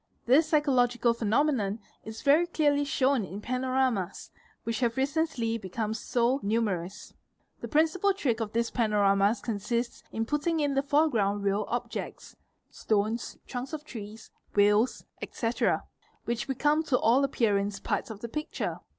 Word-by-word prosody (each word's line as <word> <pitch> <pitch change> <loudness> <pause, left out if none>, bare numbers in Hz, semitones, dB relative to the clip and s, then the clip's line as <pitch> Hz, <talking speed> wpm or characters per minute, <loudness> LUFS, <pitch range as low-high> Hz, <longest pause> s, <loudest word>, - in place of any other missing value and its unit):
This 285 +6 +5
psychological 245 -6 +3
phenomenon 225 -2 +1 0.3
is 220 0 -8
very 305 +4 +4
clearly 290 -4 +2
shown 270 -3 +2
in 190 +2 -7
panoramas, 255 -4 -1 0.3
which 230 0 -2
have 240 -1 0
recently 265 -5 0
become 210 +3 -3
so 240 +3 0
numerous; 200 -4 -2 0.5
the - - -6
principle 325 +6 +2
trick 275 - -1
of 220 -2 -3
these 235 +1 0
panoramas 205 -2 +2
consists 235 +2 -2
in 225 0 -2
putting 295 +5 0
in 290 -2 +1
the 275 - +2
foreground 240 -9 +1
real 200 +1 +1
objects 240 +2 -5 0.4
(stones, 215 +2 -1
trunks 255 +3 -6
of 305 -1 -5
trees, 220 -4 -9 0.2
wheels, 210 +4 +3 0.2
etc.) 230 0 -1 0.4
which 235 +2 -2
become 295 +3 +2
to 285 -5 +1
all 245 +5 +3
appearance 205 -6 0
parts - - -2
of 215 -2 -8
the: 235 - -4
picture. 300 +6 -4
235 Hz, 140 wpm, -28 LUFS, 215-280 Hz, 0.5 s, This